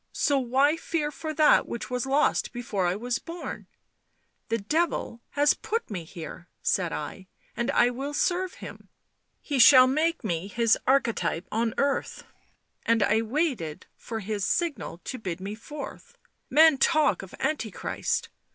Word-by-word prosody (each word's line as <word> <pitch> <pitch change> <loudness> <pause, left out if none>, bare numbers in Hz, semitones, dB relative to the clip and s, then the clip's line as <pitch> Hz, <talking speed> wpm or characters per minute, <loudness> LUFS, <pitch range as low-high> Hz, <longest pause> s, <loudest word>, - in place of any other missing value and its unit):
so 285 -1 +2
why 270 +4 +2
fear 315 -2 -2
for 310 +2 -5
that 310 0 +4
which 235 +2 -6
was 250 +1 -1
lost 280 +3 +2
before 220 -7 -2
I 175 - 0
was 240 +3 -2
born? 340 +1 -7 0.4
' - - -46
The 230 - +1
Devil 235 0 -1 0.2
has 290 0 +5
put 455 - -4
me 175 -5 -4
here/ 170 +1 -9
said 180 -3 +1
I, 185 +5 -6
' - - -36
and 235 +2 -1
I 245 -3 +4
will 275 +4 -5
serve 365 +2 0
him... - - -11 0.5
he 280 -3 -2
shall 255 +1 +9
make 310 +4 0
me 175 -3 -2
his 230 +2 +3
archetype 230 -10 +1
on 225 0 0
earth,... 280 0 -1 0.6
and 230 -2 +3
I 220 +2 +3
waited 230 - -2
for 225 -2 -6
his 205 0 -3
signal 240 - -1
to 255 - -5
bid 185 -5 -4
me 195 +2 -5
forth. 295 - -9 0.3
Men 310 -1 +6
talk 310 0 +3
of 190 - -11
Antichrist 235 -10 -2
245 Hz, 160 wpm, -27 LUFS, 205-295 Hz, 0.6 s, shall